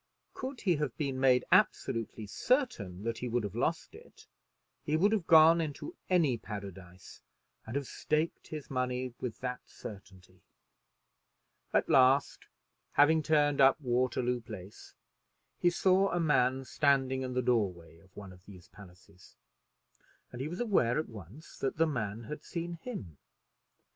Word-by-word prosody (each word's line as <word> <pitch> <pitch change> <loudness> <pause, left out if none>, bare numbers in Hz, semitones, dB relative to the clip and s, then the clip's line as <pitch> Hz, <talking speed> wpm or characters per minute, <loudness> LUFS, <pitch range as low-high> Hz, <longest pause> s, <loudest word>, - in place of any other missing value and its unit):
Could 260 -1 -6
he 180 -5 +2
have 145 -6 -3
been 135 -3 -2
made 130 -1 +4
absolutely 115 -1 +1
certain 100 - -1
that 115 0 -3
he 125 - -4
would 120 0 0
have 100 - -5
lost - - -2
it, - - -16 0.6
he 155 +1 0
would 200 +6 +3
have 205 -6 -1
gone 165 0 +7
into 160 - -5
any 155 -10 +2
paradise 95 -3 -10 0.5
and 110 - -6
have 140 -1 -1
staked 155 +5 -2
his 155 -3 -8
money 125 -1 -2
with 120 -3 -5
that 125 0 -3
certainty. 95 -3 -12 1.3
At - - +2
last, 135 +2 +3 0.5
having 155 +3 +5
turned 145 -2 +2
up 135 +2 +6
Waterloo 125 -1 0
Place, 95 -3 -11 0.6
he 175 - +4
saw 190 +2 +3
a 175 - -1
man 135 -5 +2
standing 135 -2 +1
in 130 -1 -4
the 125 - +1
door 115 -6 +2
way 85 -1 -16
of 95 +2 -24
one 100 -2 -9
of 90 0 -18
these 95 -3 -14
palaces, 90 -1 -17 1.0
and 120 - -7
he 140 - -2
was 175 +3 -6
aware 190 - +2
at 155 - -2
once 110 - -12
that 135 - -2
the 165 - +4
man 115 -7 -3
had 150 +7 -7
seen 170 0 -5
him. 95 - -8
130 Hz, 155 wpm, -31 LUFS, 105-155 Hz, 1.3 s, gone